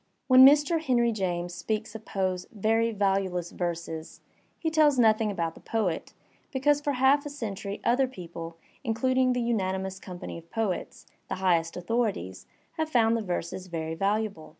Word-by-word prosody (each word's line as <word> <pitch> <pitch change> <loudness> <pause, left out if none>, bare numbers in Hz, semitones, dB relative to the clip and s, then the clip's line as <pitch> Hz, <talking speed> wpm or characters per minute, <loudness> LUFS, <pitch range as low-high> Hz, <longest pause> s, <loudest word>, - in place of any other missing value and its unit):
When 260 0 +8
Mr. 295 +4 +6
Henry 240 -5 +2
James 175 -4 -2
speaks 215 +3 -3
of 220 -1 -9
Poe's 185 -2 -2
'*very 225 +2 +1
valueless 195 -4 0
verses," 170 -2 -5 0.4
he 320 - -2
tells 305 -3 +4
nothing 220 -2 +4
about 170 -5 -2
the - - -15
poet, 205 -7 -2 0.4
because 290 +2 +2
for 290 -1 -1
half 265 +2 +4
a 295 - -5
century 210 -7 -5
other 260 +3 +3
people, 170 -6 -8 0.3
including 255 +2 +2
the 245 - -1
unanimous 190 -4 -1
com 180 -2 -9
pany 170 - -7
of 165 0 -19
poets, 220 -5 -3 0.2
the - - -1
highest 175 -3 +1
authorities, 180 - -2 0.3
have 315 -1 -1
found 230 -5 +3
the 230 - -1
verses 180 -1 -4
very 160 -2 -4
valuable. 200 -1 -1
210 Hz, 160 wpm, -28 LUFS, 180-250 Hz, 0.4 s, When